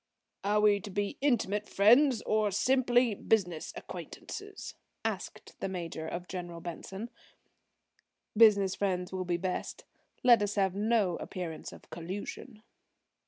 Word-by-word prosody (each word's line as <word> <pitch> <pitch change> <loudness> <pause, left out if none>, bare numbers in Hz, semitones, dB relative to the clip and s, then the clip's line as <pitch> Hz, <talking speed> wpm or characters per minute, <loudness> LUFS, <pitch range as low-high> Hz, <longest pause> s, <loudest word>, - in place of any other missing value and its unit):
"Are 210 +1 +2
we 210 -1 +4
to 205 - -8
be 205 +1 -2
intimate 210 -7 +1
friends 240 +5 +5
or 215 -1 +2
simply 245 +2 +3
business 180 -6 0
acquaintances?" - - -8 0.3
asked - - -4
the - - -2
Major 165 -3 -5
of 175 +2 -5
General 175 -2 -6
Benson. 190 +6 -7 1.2
"Business 205 -4 +6
friends 185 -2 -1
will 185 -1 -2
be 175 -1 0
best. 185 +1 -4 0.4
Let 240 -3 +7
us 205 0 -1
have 195 -3 +2
no 205 -3 +1
appearance 175 -5 -6
of - - -14
collusion." 205 +6 -7
200 Hz, 125 wpm, -31 LUFS, 180-220 Hz, 1.2 s, Let